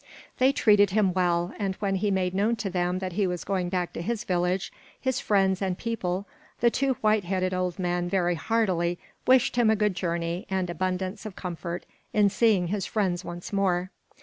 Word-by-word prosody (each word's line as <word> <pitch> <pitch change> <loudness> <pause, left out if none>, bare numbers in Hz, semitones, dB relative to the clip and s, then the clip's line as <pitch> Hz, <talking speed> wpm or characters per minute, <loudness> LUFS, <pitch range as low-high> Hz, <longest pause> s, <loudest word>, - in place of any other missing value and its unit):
They 260 +1 +5
treated 205 -6 +4
him 195 -2 +2
well, 175 0 +1
and 195 -2 -1
when 200 -1 -1
he 205 +2 0
made 185 -2 0
known 210 +5 +2
to 200 -3 -4
them 180 0 0
that 185 -1 -4
he 200 +1 +1
was 180 -1 -3
going 185 -3 -1
back 180 -1 -2
to - - -4
his 230 +5 -2
village, 180 -1 0 0.3
his 260 -1 0
friends 195 -2 +2
and 185 -2 -1
people, 200 -5 -2 0.3
the 235 0 +4
two 270 +1 +1
white 215 -1 +3
headed 185 +1 -1
old 180 -1 -1
men 175 -1 -1
very 175 -2 +2
heartily 175 -3 0 0.3
wished 255 -1 +4
him 235 -2 +4
a 220 - +4
good 210 -2 +1
journey 170 0 -2
and 190 -2 -1
abundance 185 +2 -2
of 200 - -9
comfort 175 -1 -5 0.3
in 205 -1 +4
seeing 200 -4 +3
his 200 -1 -2
friends 185 -4 0
once 175 +3 -7
more. 185 -2 +1
190 Hz, 195 wpm, -27 LUFS, 180-210 Hz, 0.3 s, They